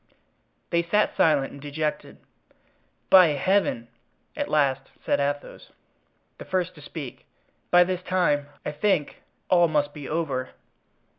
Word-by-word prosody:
They 170 -1 +3
sat 210 +5 +1
silent 145 -4 +2
and 140 - -11
dejected. 150 +1 -4 0.9
"By 185 -2 +9
Heaven!" 190 -12 +1 0.5
at 290 -1 -3
last 135 -3 +1 0.2
said - - +1
Athos, 145 0 -4 0.7
the - - -8
first 185 -1 -1
to 150 - -15
speak, 145 -3 -9 0.4
"by 175 0 +7
this 180 0 -3
time, 175 -6 +1 0.2
I - - -2
think, 155 0 -1 0.3
all 175 -2 +4
must 145 -2 0
be 145 -3 -8
over." 145 -5 -2
155 Hz, 130 wpm, -25 LUFS, 145-180 Hz, 0.9 s, By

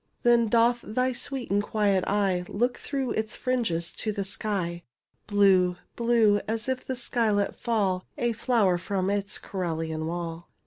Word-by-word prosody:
Then 235 -1 +5
doth 235 +2 +3
thy 255 +4 -1
sweet 260 -1 -4
and 200 +1 +3
quiet 205 -3 +1
eye 195 -3 +1
Look 245 +4 0
through 270 -4 -2
its 220 0 -2
fringes 210 -10 0
to 215 - -1
the 200 -1 -2
sky. 190 -4 -2 0.5
Blue— 190 -3 +4 0.2
blue— 230 -3 +3
as 225 +2 -2
if 260 -1 -2
that 260 - -2
sky 240 -2 0
let 205 -1 +1
fall 195 -6 0
A 240 0 +1
flower 220 -6 +2
from 190 +1 -1
its 200 0 -2
cerulean 160 -4 -3
wall. 170 0 -5
205 Hz, 155 wpm, -27 LUFS, 185-235 Hz, 0.5 s, Then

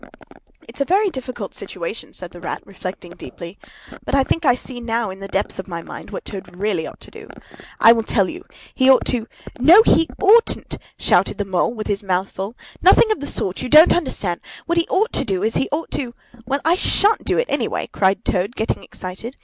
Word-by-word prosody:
"It's - - -8
a - - +5
very 390 +6 +2
difficult 250 - -6
situation," 190 +2 -7
said 180 -2 -6
the 175 - -12
Rat, - - -5
reflecting 185 -2 -8
deeply. 175 0 -10 0.4
"But - - -1
I 275 - +4
think 330 +4 -1
I 250 - +5
see 250 0 -8
now, 230 -3 -2
in 190 - -10
the 195 - -7
depths 195 0 -3
of 190 - -6
my 170 -2 -6
mind, - - -10
what - - -7
Toad 190 -3 -9
really 190 -4 -1
ought - - -11
to - - -13
do. - - -12 0.5
I 230 - +8
will 230 -1 +3
tell 210 -3 +1
you. 360 +2 -8 0.3
He 260 0 +3
ought 265 - +5
to——" 235 -3 -1 0.3
"No, 340 - +8
he 325 -7 +4
oughtn't!" 435 +4 +3 0.2
shouted - - +2
the 205 - -2
Mole, 190 +5 0
with 215 - -5
his 200 -1 -1
mouth 190 -1 -1
full. 195 +5 -6 0.3
"Nothing 390 +5 +6
of 430 - 0
the 285 - -4
sort! 185 -1 -2
You 255 - -4
don't 310 +4 +8
understand. 205 - -2 0.2
What 340 0 +1
he 335 - 0
ought 425 +5 +1
to - - +1
do 195 -6 -2
is, 220 +1 +1
he - - 0
ought 310 +3 -3
to——" 240 -3 -3 0.3
"Well, 275 +1 -1
I 330 - +5
shan't 405 +3 +2
do - - 0
it, 485 - +2
anyway!" - - -1
cried 195 +2 +1
Toad, 195 +4 -1
getting 220 - -2
excited. 190 +8 -8
230 Hz, 220 wpm, -20 LUFS, 190-290 Hz, 0.5 s, I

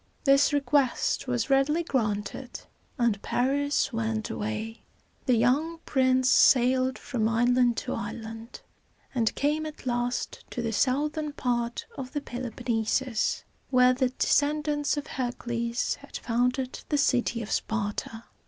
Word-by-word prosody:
This 275 0 +5
request 275 -2 +1
was 245 +1 -1
readily 290 +5 +3
granted, 220 -2 -2 0.4
and 230 -4 +1
Paris 280 +2 0
went 225 -1 -2
away. 220 +2 -4 0.5
The 250 - +5
young 275 +9 +2
prince 260 -1 +2
sailed 255 0 +4
from 225 -4 -1
island 240 +1 +3
to - - -2
island, 225 +3 -7 0.5
and 230 -4 +1
came 300 +2 0
at 305 - -10
last 245 0 -2
to 240 - -4
the 225 -1 -2
southern 295 +5 0
part 240 -3 -2
of 260 -1 -6
the 290 - -2
Peloponnesus, 240 -1 -1 0.3
where 250 -1 +5
the 255 0 +1
descendants 295 +2 +1
of 290 - -3
Hercules 240 -2 -2
had - - -8
founded 250 +2 -1
the 295 - +2
city 245 -4 +1
of 210 - -8
Sparta. 225 +1 -2
250 Hz, 125 wpm, -27 LUFS, 230-275 Hz, 0.5 s, This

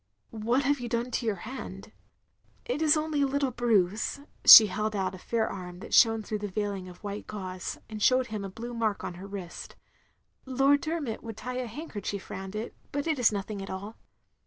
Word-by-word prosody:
" - - -47 0.2
"What 255 +4 +3
have 285 +1 +1
you 240 -1 -5
done 235 +1 -1
to 240 - -2
yotir 210 -3 0
hand?'* 220 -5 -8 0.7
"It 260 +5 -2
is 310 -1 +5
only 305 -1 -1
a 280 - +3
little 275 -1 0
bruise 220 -2 +1
— - - -37
" - - -30
she 220 - +13
held 215 +2 -2
out 190 -1 -1
a 185 - -9
fair 225 +3 -1
arm 180 -2 -7
that 230 - -8
shone 225 -1 +5
through 215 0 -3
its 205 -3 -5
veiling 200 -3 -2
of 180 - -15
white 205 0 -5
gauze, 185 -3 -5
and 215 -1 -7
showed 255 +3 +4
him 210 -2 -3
a 195 - -5
blue 235 +5 -7
mark 220 -3 -1
on - - -4
her 185 +3 -9
wrist; 195 -4 -8 0.4
" - - -45 0.2
Lord 275 +2 +3
Dermot 310 -8 -3
would 225 -2 -8
tie 250 +2 -5
a 250 - -3
handkerchief 215 - -6
round 190 +1 -6
it, 215 +2 -5 0.2
but 285 0 -2
it 315 -4 0
is 240 - +5
nothing 205 0 -4
at 195 - -7
all. 200 +4 -6
220 Hz, 225 wpm, -28 LUFS, 200-255 Hz, 0.7 s, she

